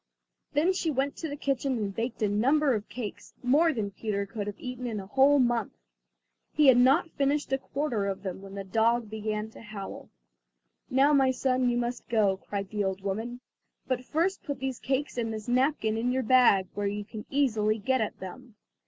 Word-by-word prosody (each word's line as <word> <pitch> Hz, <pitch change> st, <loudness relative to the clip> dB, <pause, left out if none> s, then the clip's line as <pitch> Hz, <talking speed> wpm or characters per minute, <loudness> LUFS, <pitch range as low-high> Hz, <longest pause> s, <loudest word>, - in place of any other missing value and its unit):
Then 320 Hz, +6 st, +3 dB
she 355 Hz, -3 st, -1 dB
went 275 Hz, -1 st, 0 dB
to 320 Hz, -, -4 dB
the 285 Hz, -, -4 dB
kitchen 275 Hz, -2 st, -1 dB
and 205 Hz, -3 st, -2 dB
baked 230 Hz, 0 st, -3 dB
a -, -, +4 dB
number 265 Hz, +8 st, +3 dB
of 215 Hz, -1 st, -3 dB
cakes, 225 Hz, -5 st, -7 dB
more 300 Hz, +7 st, +4 dB
than 215 Hz, -8 st, -3 dB
Peter 200 Hz, 0 st, -2 dB
could 205 Hz, 0 st, -5 dB
have 205 Hz, -, -6 dB
eaten 250 Hz, 0 st, -5 dB
in 220 Hz, -3 st, -3 dB
a 195 Hz, -, -7 dB
whole 270 Hz, +7 st, +4 dB
month. 240 Hz, -3 st, +1 dB, 0.8 s
He 300 Hz, -, +3 dB
had 250 Hz, -, +7 dB
not 275 Hz, +7 st, +4 dB
finished 280 Hz, 0 st, 0 dB
a 270 Hz, -, +2 dB
quarter 260 Hz, -8 st, -2 dB
of 195 Hz, 0 st, -4 dB
them, 190 Hz, -1 st, -5 dB
when 195 Hz, 0 st, -10 dB
the 200 Hz, -, -4 dB
dog 225 Hz, +3 st, +1 dB
began 215 Hz, 0 st, -3 dB
to -, -, -13 dB
howl. 210 Hz, -3 st, -8 dB, 0.8 s
"Now, 275 Hz, +3 st, +4 dB
my 270 Hz, -2 st, +5 dB
son, 255 Hz, -1 st, +1 dB
you 240 Hz, -, +1 dB
must 240 Hz, 0 st, -3 dB
go," 210 Hz, -5 st, +3 dB
cried 200 Hz, 0 st, -5 dB
the 210 Hz, -1 st, -1 dB
old 190 Hz, 0 st, -2 dB
woman 225 Hz, +6 st, -4 dB, 0.5 s
"but 255 Hz, -1 st, -1 dB
first 340 Hz, +8 st, 0 dB
put 285 Hz, -2 st, -4 dB
these 265 Hz, -1 st, -3 dB
cakes 265 Hz, -1 st, -2 dB
and 225 Hz, -1 st, -1 dB
this 215 Hz, -1 st, -6 dB
napkin 245 Hz, -3 st, +1 dB
in 240 Hz, +2 st, 0 dB
your 260 Hz, +1 st, 0 dB
bag, 225 Hz, -6 st, +5 dB
where 205 Hz, 0 st, -1 dB
you 205 Hz, +1 st, -3 dB
can 215 Hz, 0 st, -9 dB
easily 220 Hz, -6 st, +2 dB
get 260 Hz, +4 st, +1 dB
at 215 Hz, -, -3 dB
them." 220 Hz, +5 st, -9 dB
240 Hz, 205 wpm, -28 LUFS, 210-270 Hz, 0.8 s, had